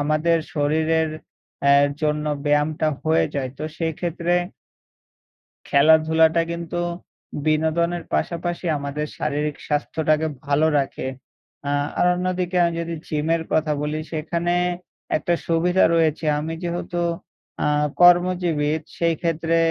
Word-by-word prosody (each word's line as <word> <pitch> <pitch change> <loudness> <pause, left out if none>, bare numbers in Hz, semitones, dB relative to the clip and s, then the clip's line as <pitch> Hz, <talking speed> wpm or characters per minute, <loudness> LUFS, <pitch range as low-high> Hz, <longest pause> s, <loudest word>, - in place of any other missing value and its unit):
আমাদের 155 +3 +2 0.2
শরীরের 160 +2 +1 0.6
আ - - +7 0.3
জন্য 150 0 0 0.2
ব্যায়ামটা 150 +1 +1 0.2
হয়ে 160 +1 +3
যায়। 135 -2 -2
তো - - -4
সেক্ষেত্রে 170 +1 -1 1.4
খেলাধুলাটা 160 +2 +5
কিন্তু 170 +1 -4 0.7
বিনোদনের 160 +3 +1
পাশাপাশি 175 +1 -2
আমাদের 140 +2 -4
শারীরিক 150 0 -2
স্বাস্থ্যটাকে 155 +1 0 0.2
ভালো 145 +2 +3
রাখে। 135 -1 -3 0.6
আ - - +1 0.3
আর - - +4
অন্যদিকে 180 0 -1
আমি 170 - 0
যদি 170 0 -4
জিমের 160 +2 0
কথা 155 -1 +2
বলি 150 +1 -2
সেখানে 170 +2 -1 0.6
একটা 175 - -1
সুবিধা 175 +3 +3
রয়েছে। 160 -1 +1
আমি 160 +2 -4
যেহেতু 175 0 -3 0.6
আ - - +2 0.3
কর্মজীবী 175 -4 +4 0.3
সেই 170 -1 +1
ক্ষেত্রে 165 0 0
160 Hz, 110 wpm, -22 LUFS, 150-170 Hz, 1.4 s, আ